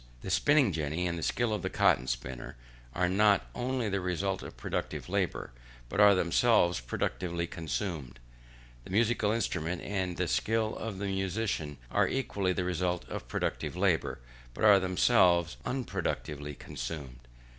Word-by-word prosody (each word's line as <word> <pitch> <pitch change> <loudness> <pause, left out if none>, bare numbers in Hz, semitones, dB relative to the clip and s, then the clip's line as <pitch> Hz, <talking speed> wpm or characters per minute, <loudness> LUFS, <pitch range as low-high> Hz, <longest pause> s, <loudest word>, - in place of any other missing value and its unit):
The 95 - -5
spinning 145 +1 +4
jenny, 80 +2 -2
and 85 -1 -1
the 85 - -5
skill 120 +6 0
of 105 - -2
the - - -2
cotton - - +3
spinner, 60 0 -4 0.4
are 90 0 +2
not 100 +2 +4
only 125 -1 -1
the 100 -1 0
result 90 +2 -1
of - - -9
productive - - -4
labour, - - -1 0.4
but - - -3
are 105 -1 +8
themselves 90 - +3
productively 85 +7 -2
consumed. 80 - -4 0.6
The - - -12
musical 110 +1 +2
instrument 90 -6 -1
and 95 -3 -2
the 90 - 0
skill 110 +5 0
of 110 -4 -5
the 100 - -3
musician 95 -6 -2
are - - +3
equally 100 -8 -1
the 90 0 -1
result 90 0 -1
of - - -6
productive - - -2
labour, 90 -3 +1 0.4
but - - -5
are 105 -2 +8
themselves 90 -2 +3
unproductively 75 - -3
consumed. 70 -6 -6
90 Hz, 150 wpm, -30 LUFS, 85-105 Hz, 0.6 s, are